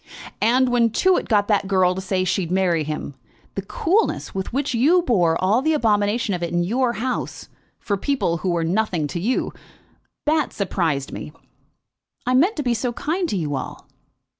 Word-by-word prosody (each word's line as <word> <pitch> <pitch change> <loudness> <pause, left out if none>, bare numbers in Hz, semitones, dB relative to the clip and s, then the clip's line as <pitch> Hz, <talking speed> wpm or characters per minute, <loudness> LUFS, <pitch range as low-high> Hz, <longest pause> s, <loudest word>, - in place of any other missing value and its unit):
"And 250 +4 +3
when 240 -1 +3
Tewett 370 - +2
got 205 -3 +3
that 205 -2 +2
girl 185 -2 +3
to 190 - -5
say 185 0 -1
she'd 180 -1 -1
marry 180 -4 +2
him, 150 -1 -5 0.4
the 195 - -3
coolness 345 - 0
with 190 -1 -4
which 280 +2 -1
you 310 +10 +4
bore 175 - +2
all 205 +7 +2
the 315 +3 +2
abomination 210 -3 +1
of 180 - -3
it 170 - -2
in 175 0 +1
your 240 +6 +1
house, 245 +2 -4 0.3
for 200 - -2
people 225 - 0
who 185 +3 -2
were 170 -1 0
nothing 180 -2 0
to 145 +4 -4
you; 235 +9 -1 0.7
that 305 -2 +1
surprised 165 -8 -1
me!" - - -7 0.9
"I 250 - +1
meant 335 - +4
to 295 - -2
be 245 -2 +1
so 240 +1 -1
kind 335 +7 -2
to 200 - -1
you 150 -5 -2
all." 130 - -6
205 Hz, 185 wpm, -22 LUFS, 180-255 Hz, 0.9 s, you